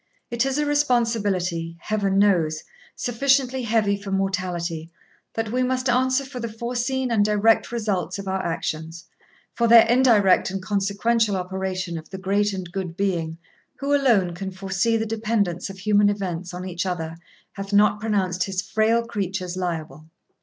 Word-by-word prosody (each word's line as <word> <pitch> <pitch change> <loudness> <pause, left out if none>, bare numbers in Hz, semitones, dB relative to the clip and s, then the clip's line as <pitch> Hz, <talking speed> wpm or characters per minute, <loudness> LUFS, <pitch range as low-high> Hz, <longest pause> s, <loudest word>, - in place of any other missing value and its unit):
It 235 +3 +1
is 270 +1 -1
a 295 - +1
responsibility, 205 - 0
Heaven 200 -2 0
knows, 170 -6 +2 0.3
sufficiently 260 +1 +1
heavy 220 -3 +1
for 200 0 -8
mortality, 180 -4 -2 0.5
that 225 -1 -2
we 250 +2 0
must 255 +1 0
answer 260 +2 +2
for 260 -1 -8
the 235 -1 -4
foreseen 245 +3 -2
and 215 -3 +3
direct 210 +2 +3
result 205 -8 -2
of 200 -1 -7
our 190 0 -1
actions; 165 0 -4 0.5
for 235 - +1
their 230 -1 +8
indirect 230 -7 +4
and 195 +1 -3
consequential 200 +3 +1
operation 185 -2 -3
the 190 - -7
great 200 +2 +1
and 185 -3 -6
good 180 -2 -5
Being, 170 -5 -1 0.4
who 280 +1 -1
alone 230 -11 +3
can 190 +2 -5
foresee 195 +4 0
the 225 - -1
dependence 215 -5 -1
of 195 - -9
human 205 +1 +3
events 185 -3 -3
on 180 +1 -6
each 180 0 -3
other, 165 -3 -3 0.4
hath 195 0 -7
not 205 0 +4
pronounced 190 -4 0
his 190 -1 -3
frail 220 +4 +1
creatures 190 -4 -3
liable.' 160 -4 -4
200 Hz, 155 wpm, -23 LUFS, 185-230 Hz, 0.5 s, their